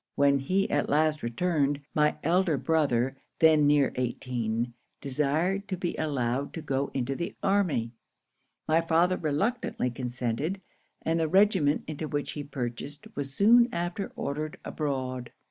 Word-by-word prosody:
'When 140 0 +4
he 185 +9 +1
last 150 +1 +1
returned, 145 +3 0
my 150 0 +3
elder 170 -1 +2
brother, 135 -3 +1 0.2
then 155 -2 +5
near 145 -2 +4
eighteen, 120 -2 -2 0.3
desired 155 +9 0
to 190 -2 -3
be 175 -1 -2
allowed 135 -3 -1
to 165 - -4
go 140 -1 -1
into 135 +1 -1
the 170 - -4
army. 180 - +1 0.8
My 160 +1 +4
father 170 +2 +3
reluctantly 155 - -1
consented; 125 +8 -2 0.4
and 165 +1 +1
the 160 - +1
regiment 185 -5 +3
into 155 0 -5
which 145 -1 -2
he 145 - -5
purchased 140 +1 -5
was 140 -1 -3
soon 235 +4 +6
after 175 +3 -3
ordered 150 +2 -3
abroad. 130 -4 -3
150 Hz, 135 wpm, -28 LUFS, 135-170 Hz, 0.8 s, soon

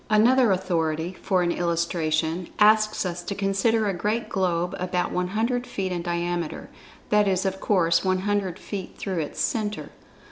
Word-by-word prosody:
Another 230 +2 +5
authority, 170 -2 -1
for 190 -2 +1
an 175 - +1
illustration, 170 -1 -1
asks 215 -1 +4
us 175 -1 -3
to 200 +3 -5
consider 205 +3 +1
a 195 - 0
great 210 +6 -2
globe 180 -2 0
about 180 0 -1
100 220 +7 -1
feet 190 -2 -3
in 175 -1 -2
diameter—that 175 +4 -2
is, 190 0 +1
of 190 0 -1
course, 170 -4 +2
100 190 -1 0
feet 195 -3 -7
through 190 -4 -3
its 150 - -4
centre. 210 -2 -2
185 Hz, 145 wpm, -25 LUFS, 175-210 Hz, -, Another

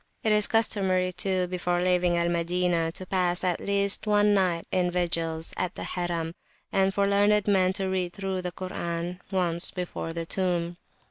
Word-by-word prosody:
It 220 - +2
is 210 -1 +4
customary, 190 -5 +2
too, 185 0 0
before 175 -1 -1
leaving 180 -1 +2
Al 170 0 +1
Madinah, 170 -1 0
to 185 - -6
pass 180 -1 +1
at 180 -2 0
least 200 +1 +1
one 210 0 +4
night 180 -4 +1
in 180 -1 +1
vigils 165 -2 -1
at 180 -1 -2
the - - -5
Harim, 170 -2 -3 0.4
and 195 0 +2
for 200 +1 +1
learned 205 +1 +3
men 190 -2 +3
to 190 0 -2
read 185 -2 -1
through 195 -2 -3
the 180 0 -4
Koran 175 -1 -4
once 175 -2 0
before 180 -2 -5
the 165 0 -4
tomb. 175 -1 -1
180 Hz, 175 wpm, -27 LUFS, 175-195 Hz, 0.4 s, is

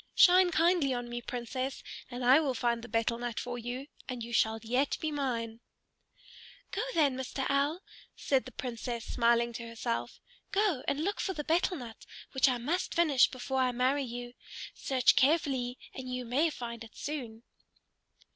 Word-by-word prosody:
Shine 365 0 +7
kindly 330 -5 +3
on 245 0 -4
me, 240 0 -4
Princess, 255 +3 -4 0.3
and 245 0 -4
I 260 +4 +7
will 280 -5 0
find 235 -1 0
the 240 - -8
betel 230 +1 0
nut 240 -2 -3
for 245 0 -4
you, 245 +3 -5 0.2
and 250 -2 -4
you 235 +1 -7
shall 220 0 +3
yet 250 +5 +1
be 315 - -2
mine." 235 -6 -2 1.1
"Go 405 - -1
then, 285 -5 +3
Mr. 265 +1 -3
Owl," 285 +6 +1 0.3
said 265 -2 +1
the 255 - -9
Princess, 240 -2 -4
smiling 235 0 +2
to 230 0 -6
herself. 230 +1 -3 0.3
"Go 390 -9 +2
and 290 +2 0
look 405 +4 -1
for 380 - -1
the 300 - -4
betel 345 +3 +1
nut 235 -4 -9 0.3
which 265 0 +4
I 250 - +1
must 300 +10 -2
finish 305 -7 +5
before 265 +1 -3
I 255 -1 +3
marry 260 +4 +2
you. 245 -1 -6 0.4
Search 260 -2 +3
carefully 265 -4 +2 0.2
and 255 -1 -6
you 250 0 -3
may 275 +8 +2
find 235 -5 -6
it 225 - -14
soon." 240 -6 -5
255 Hz, 175 wpm, -31 LUFS, 240-285 Hz, 1.1 s, Shine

